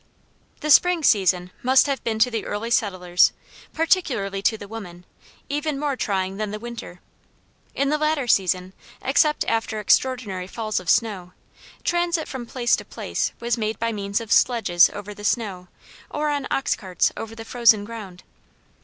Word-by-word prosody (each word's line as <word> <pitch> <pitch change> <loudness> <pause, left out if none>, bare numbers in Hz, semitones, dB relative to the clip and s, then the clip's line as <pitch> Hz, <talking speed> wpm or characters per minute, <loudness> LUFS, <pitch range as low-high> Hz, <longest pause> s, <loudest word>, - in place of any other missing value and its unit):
The 305 - 0
spring 355 +2 +5
season 180 -6 +3
must 260 +1 +5
have 275 -3 -2
been 225 -1 -1
to 240 +3 +3
the 225 -2 -2
early 225 +3 -4
settlers, 180 -5 +2 0.4
particularly 255 - 0
to 220 +2 +2
the 205 - -10
women, 180 -5 -9 0.4
even 295 0 -2
more 290 -2 -1
trying 195 -4 -2
than 215 0 -2
the 210 - -4
winter. 230 -6 -9 0.7
In 280 0 +1
the 300 +1 +1
latter 305 -3 +1
season, 185 -3 +1 0.3
except 300 +3 +2
after 225 -1 -1
extraordinary 210 -4 +1
falls 215 +1 -2
of 180 -2 -7
snow, 195 -6 +1 0.5
transit 345 -2 0
from 250 -3 -6
place 240 -1 +1
to - - -7
place - - -3
was 235 0 -1
made 215 -1 -2
by 230 0 -1
means 200 -1 -2
of 230 -1 -8
sledges 195 -8 +4
over 205 0 -8
the 205 - -12
snow 200 -5 -1 0.4
or 300 0 -1
on 285 -2 -2
ox 270 - 0
carts 185 -3 0
over 225 0 -7
the 225 0 -9
frozen 225 -4 +4
ground. 205 -5 -9
225 Hz, 165 wpm, -23 LUFS, 195-260 Hz, 0.7 s, spring